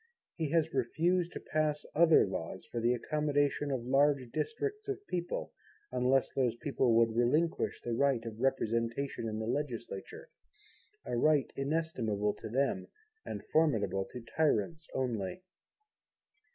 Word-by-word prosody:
He 160 -3 -2
has 165 0 +1
refused 170 +7 +1
to - - -5
pass 155 -1 -1
other 165 0 +6
Laws - - -5
for 120 - -2
the 120 +2 +3
accommodation 145 +1 0
of 130 -4 -2
large 135 -1 +3
districts 425 -1 -3
of 405 0 -4
people, 175 - -3 0.4
unless 125 +1 +2
those 125 -4 +1
people 125 -2 +1
would 115 -1 +4
relinquish 150 +8 +1
the 120 - -2
right 130 -1 +2
of 110 -1 -6
Representation 115 0 0
in 110 -1 -3
the 110 - -3
Legislature, 120 -5 -4 0.8
a 125 - -2
right 145 +2 +3
inestimable 135 -9 0
to - - -7
them 135 +4 0 0.4
and - - -5
formidable 110 - +2
to 125 - -9
tyrants 155 +3 0
only. 125 - -2
135 Hz, 135 wpm, -32 LUFS, 115-155 Hz, 0.8 s, other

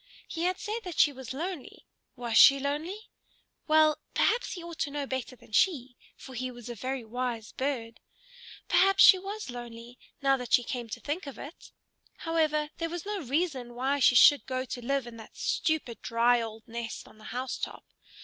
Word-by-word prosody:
He 335 +1 -3
had 365 +1 +1
said 435 +2 -4
that 360 -4 -7
she 290 - +5
was 265 -2 -8
lonely; 325 +2 -6 0.3
was 240 -3 -3
she 275 +3 +8
lonely? 315 - -4 0.6
Well, 310 -1 +4 0.2
perhaps 480 -3 +2
he 355 -3 -7
ought 340 -1 -9
to 290 - 0
know 285 0 -3
better 260 -1 -4
than 235 - -20
she, 260 - +2 0.2
for 265 - -12
he 255 +1 -3
was 240 -1 -10
a - - -4
very 255 +3 -4
wise 235 -1 -4
bird. 245 -4 -3 0.7
Perhaps 390 +1 +5
she 390 -2 +9
was 400 -5 -6
lonely, 240 0 -9 0.2
now 275 -1 +3
that 250 -2 -6
she 245 - +6
came 240 -1 -5
to - - -5
think 300 +2 -4
of 275 - -8
it. 295 +5 -11 0.5
However, 305 -2 +1
there 330 0 -2
was 345 +1 -6
no 410 -2 -3
reason 270 -4 -2
why 270 +3 0
she 250 - +5
should 290 +4 +7
go 255 0 -2
to 245 -1 -6
live 275 +1 0
in 235 -1 -10
that 220 - -13
stupid, 315 -8 -1
dry, 235 +1 +3
old 220 -1 -7
nest 230 0 -6
on 215 - -18
the 215 - -14
house 255 +2 -4
top. - - -6
270 Hz, 195 wpm, -29 LUFS, 240-320 Hz, 0.7 s, she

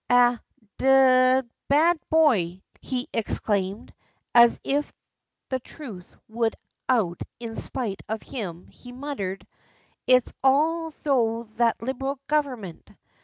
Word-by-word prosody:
"A 245 -1 +5 0.4
d 260 -1 +5
d 250 - -23 0.2
bad 320 +4 +4
boy!" 205 - +3 0.2
he 255 -1 -3
exclaimed, 205 -2 -2 0.4
and 235 0 +9
as 235 - -1
if 290 +2 -1 0.6
the 260 - -1
truth 235 - -11
would 225 0 -1 0.3
out 210 -9 +1 0.2
in 230 -2 -6
spite 225 -4 -4
of 220 0 -3
him 185 -9 -6
he 245 - -14
muttered: 245 -8 -5 0.6
"It's 255 -1 +4
all 320 +5 +3
thro' 235 -7 0
that 230 -1 +1
Liberal 270 +3 -3
Government." 255 - -2
245 Hz, 120 wpm, -25 LUFS, 220-275 Hz, 0.6 s, and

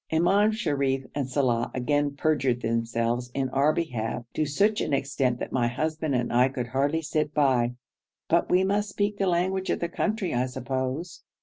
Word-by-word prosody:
Imam 190 +6 +3
Sharif 140 - 0
and 140 -3 -2
Saleh 125 -4 +1
again 145 +2 0
perjured 135 -5 +1
themselves 115 +1 -1
in 135 -1 0
our 140 +3 +3
behalf 120 -7 -3
to 155 - 0
such 205 +9 +2
an - - -1
extent 135 -2 0
that - - -5
my 120 -2 +1
husband 155 +3 -1
and 120 -1 -1
I 125 +2 +4
could 125 -2 -3
hardly 140 +6 0
sit 150 -1 -1
by, 125 -4 +2 0.5
but 170 +1 +2
we 180 +1 +4
must 205 +2 0
speak 205 +1 -1
the 195 - +1
language 185 +2 0
of - - 0
the 170 - -2
country, 210 +2 -1
I 125 +1 +1
suppose. 130 +6 -4
140 Hz, 180 wpm, -26 LUFS, 125-170 Hz, 0.5 s, I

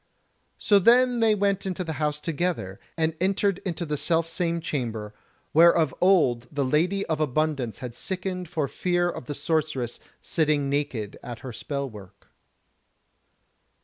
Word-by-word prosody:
So 205 -1 +4
then 245 +4 +5
they 225 -2 +4
went 200 -1 0
into 185 -1 -2
the 160 -2 -4
house 150 0 0
together, 160 - -2 0.2
and 160 0 +1
entered 195 0 +1
into 175 -2 -4
the 150 -1 -2
self 165 +2 +1
same 170 0 -1
chamber, 115 -9 -3 0.4
where 170 +2 +7
of 160 -6 +1
old 145 -11 +3
the 140 -2 0
Lady 175 +9 +1
of 160 -2 -1
Abundance 145 -5 0
had 120 - -6
sickened 185 +4 -4
for 160 -4 -1
fear 175 +3 0
of 130 - -8
the 145 - -4
Sorceress 155 -8 -1 0.2
sitting 150 -4 0
naked 135 -8 -2
at 120 -1 -8
her 125 - -6
spell 140 +4 -3
work. 100 -4 -13
160 Hz, 150 wpm, -26 LUFS, 135-180 Hz, 0.4 s, where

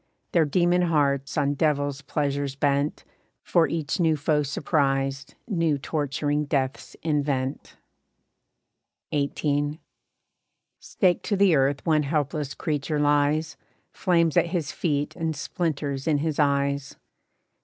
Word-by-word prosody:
Their 165 -3 +4
demon 175 +4 +2
hearts 140 -5 +1
on 140 0 +2
devils' 145 -2 0
pleasures 140 -1 -2
bent, 140 +1 0 0.4
For 170 -2 +3
each 160 +1 -2
new 160 -3 +3
foe 150 +1 +1
surprised, 135 -1 -1
new 165 -8 +1
torturing 145 +1 -1
deaths 135 -2 -2
invent. 145 -4 -1 1.4
XVIII. 145 +1 0 1.0
Staked 180 -3 +1
to 205 - 0
the 190 -4 +5
earth 135 0 +1
one 155 -2 +3
helpless 145 -1 -2
creature 150 0 -2
lies, 145 +1 +2 0.3
Flames 170 -4 +2
at - - +4
his 165 -4 -2
feet 145 -4 -1
and 160 -2 -2
splinters 145 -2 -3
in 155 -2 +3
his 155 +1 -2
eyes. 140 -1 +1
145 Hz, 115 wpm, -25 LUFS, 140-160 Hz, 1.4 s, the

